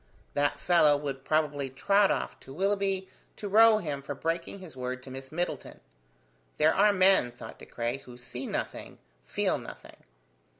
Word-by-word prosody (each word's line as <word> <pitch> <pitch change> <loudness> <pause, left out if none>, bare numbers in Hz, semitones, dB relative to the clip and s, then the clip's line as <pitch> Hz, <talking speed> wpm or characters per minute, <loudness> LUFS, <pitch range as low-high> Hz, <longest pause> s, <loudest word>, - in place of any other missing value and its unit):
That 145 0 0
fellow 155 -5 +4
would 140 -2 -5
probably 145 -2 0
trot 195 +10 +3
of - - -2
to - - -13
Willoughby 195 +3 0 0.3
to 205 - -6
row 220 +2 +6
him 150 -8 -4
for 140 +1 -6
breaking 165 +5 -3
his 185 -7 -11
word 130 0 -5
to 130 - -10
Miss 135 0 -8
Middleton! 175 +3 -4 0.8
There 155 +1 +4
are 205 +1 +5
men, 190 -9 +4
thought 120 - -11
De - - -12
Craye, 120 +2 -2
who 125 -2 -13
see 125 +1 -6
nothing, - - -5 0.3
feel - - 0
nothing. - - -11
150 Hz, 165 wpm, -29 LUFS, 135-190 Hz, 0.8 s, row